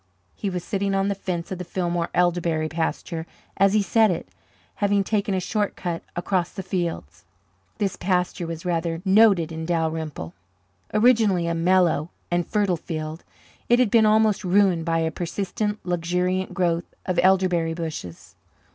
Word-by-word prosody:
He 200 Hz, -, -3 dB
was 180 Hz, -2 st, -4 dB
sitting 195 Hz, 0 st, -1 dB
on 195 Hz, +1 st, +1 dB
the -, -, +1 dB
fence 180 Hz, -3 st, -4 dB
of 185 Hz, -, -4 dB
the -, -, -3 dB
Fillmore 175 Hz, -1 st, -2 dB
elderberry 170 Hz, -3 st, +1 dB
pasture 160 Hz, +1 st, -3 dB, 0.3 s
as 195 Hz, +1 st, +4 dB
he 215 Hz, -1 st, +3 dB
said 220 Hz, +3 st, +4 dB
it, 175 Hz, -, -3 dB, 0.5 s
having 205 Hz, -1 st, +2 dB
taken 200 Hz, -1 st, 0 dB
a -, -, +1 dB
short 205 Hz, +2 st, -1 dB
cut 170 Hz, -2 st, -3 dB
across 175 Hz, 0 st, 0 dB
the 190 Hz, -, -7 dB
fields. 165 Hz, -, -4 dB, 0.5 s
This 200 Hz, -3 st, -1 dB
pasture 180 Hz, -1 st, -1 dB
was 165 Hz, +1 st, -6 dB
rather 165 Hz, -1 st, -1 dB
noted 195 Hz, -4 st, +5 dB
in 160 Hz, 0 st, -5 dB
Dalrymple. 160 Hz, -, -2 dB, 0.6 s
Originally 215 Hz, -5 st, +3 dB
a 170 Hz, -, 0 dB
mellow 170 Hz, -2 st, +2 dB, 0.2 s
and 175 Hz, 0 st, 0 dB
fertile 205 Hz, -4 st, +1 dB
field, 155 Hz, 0 st, -5 dB, 0.5 s
it 240 Hz, -, +6 dB
had 245 Hz, -5 st, +2 dB
been 220 Hz, -2 st, +5 dB
almost 215 Hz, -1 st, +3 dB
ruined 185 Hz, -3 st, +3 dB
by 165 Hz, -1 st, +1 dB
a 160 Hz, 0 st, 0 dB
persistent, 195 Hz, +5 st, -3 dB
luxuriant 180 Hz, +2 st, -1 dB
growth 170 Hz, -2 st, -1 dB
of 185 Hz, -1 st, 0 dB
elderberry 180 Hz, -3 st, +2 dB
bushes. 155 Hz, -, -6 dB
180 Hz, 155 wpm, -24 LUFS, 165-195 Hz, 0.6 s, it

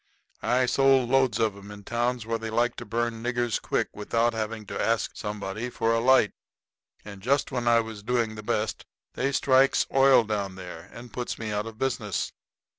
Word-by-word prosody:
I 125 Hz, +1 st, +2 dB
sold 135 Hz, 0 st, +3 dB
loads 130 Hz, -5 st, +3 dB
of 110 Hz, -3 st, +1 dB
'em 100 Hz, 0 st, -12 dB
in 105 Hz, 0 st, -10 dB
towns 120 Hz, +1 st, -1 dB
where 115 Hz, 0 st, -2 dB
they 110 Hz, 0 st, -5 dB
like 120 Hz, +2 st, +1 dB
to -, -, -6 dB
burn 115 Hz, +1 st, -2 dB
niggers 120 Hz, -1 st, -1 dB
quick, -, -, 0 dB
without 115 Hz, +3 st, 0 dB
having 110 Hz, -1 st, -4 dB
to -, -, -4 dB
ask 115 Hz, -3 st, +1 dB
somebody 105 Hz, +2 st, -4 dB
for 115 Hz, -1 st, 0 dB
a 115 Hz, -, +2 dB
light. 125 Hz, -3 st, +4 dB, 0.7 s
And 100 Hz, -2 st, -9 dB
just 140 Hz, +8 st, +1 dB
when 125 Hz, -2 st, -2 dB
I 115 Hz, 0 st, +5 dB
was 110 Hz, -2 st, -8 dB
doing 115 Hz, 0 st, 0 dB
the 110 Hz, -, -7 dB
best 105 Hz, +1 st, -2 dB, 0.3 s
they 135 Hz, +2 st, -1 dB
strikes 135 Hz, 0 st, +4 dB
oil 135 Hz, -2 st, +6 dB
down 100 Hz, -3 st, -3 dB
there 90 Hz, -3 st, -9 dB
and 120 Hz, +1 st, -11 dB
puts 125 Hz, -1 st, -4 dB
me 110 Hz, -1 st, -4 dB
out 105 Hz, +1 st, -2 dB
of 110 Hz, -1 st, -9 dB
business. 115 Hz, -8 st, -2 dB
115 Hz, 190 wpm, -27 LUFS, 105-125 Hz, 0.7 s, oil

